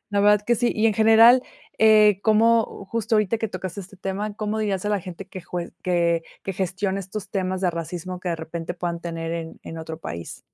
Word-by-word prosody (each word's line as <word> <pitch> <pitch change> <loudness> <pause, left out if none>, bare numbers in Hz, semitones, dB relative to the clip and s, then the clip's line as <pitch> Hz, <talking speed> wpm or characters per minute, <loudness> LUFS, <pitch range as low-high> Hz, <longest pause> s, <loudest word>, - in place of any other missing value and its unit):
la 200 0 +1
verdad 210 0 +5
que 240 +2 +3
sí. 240 +1 +1
Y 220 +1 +2
en 220 - +3
general, 225 +4 +7 0.4
eh, 215 -2 +6
¿cómo? 225 -1 +3
Justo 230 0 -1
ahorita 215 +1 +2
que 225 - -2
tocaste 190 0 -5
este 195 +1 -12
tema, 200 +2 -4
¿cómo 215 0 -2
dirías 205 -3 -1
a - - 0
la 205 - +1
gente 185 +2 -9
que 185 - -8
jue 175 0 -5
que 170 -2 +1 0.2
que 195 - -3
gestione 190 +1 -2
estos 195 +2 -7
temas 185 -1 -2
de 180 - +3
racismo 175 +2 -5
que 180 - -4
de 170 - -1
repente 165 +1 -5
puedan 170 -1 -3
tener 165 -1 -4
en 165 -1 -6
en 165 - -8
otro 160 0 -7
país? 85 - -7
190 Hz, 215 wpm, -24 LUFS, 170-215 Hz, 0.4 s, general